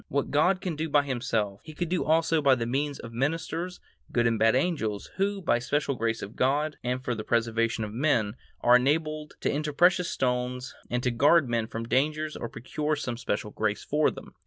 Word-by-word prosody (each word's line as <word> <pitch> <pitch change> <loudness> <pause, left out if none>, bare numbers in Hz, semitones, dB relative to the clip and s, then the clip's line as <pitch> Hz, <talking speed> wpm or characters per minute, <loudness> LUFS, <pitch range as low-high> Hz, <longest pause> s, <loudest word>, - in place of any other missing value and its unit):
What 140 0 -1
God 180 +6 +3
can 180 -5 -3
do 160 +2 -3
by 145 0 +4
Himself, 115 -7 -2
He 155 -1 -11
could 175 - -2
do 180 0 0
also 160 0 +2
by 135 -2 +5
means 135 +4 -1
of 115 0 -9
ministers, 165 +7 -2 0.3
good 120 -1 +2
and 115 -1 +2
bad 115 +2 +4
angels, 130 - -1
who, 195 0 0
by 120 -8 +2
special 140 +3 0
grace 115 -2 -1
of 100 - -8
God 145 +4 +1
and 125 +1 -2
for 125 - 0
the 110 -2 -4
preservation 115 0 0
of 105 -1 -5
men, 115 -5 +1 0.3
are 120 +1 +7
enabled 155 +3 -1
to - - +1
enter 150 +1 -2
precious 175 +3 +3
stones 125 0 -1 0.2
and 125 0 -1
to 125 - +1
guard 145 +5 +4
men 115 -2 0
from 115 0 -5
dangers 150 +4 0
or 120 - -5
procure 150 +6 -2
some 130 -5 -3
special 110 -3 -3
grace 105 -1 -1
for 150 +1 +2
them. - - -10
130 Hz, 205 wpm, -27 LUFS, 115-155 Hz, 0.3 s, are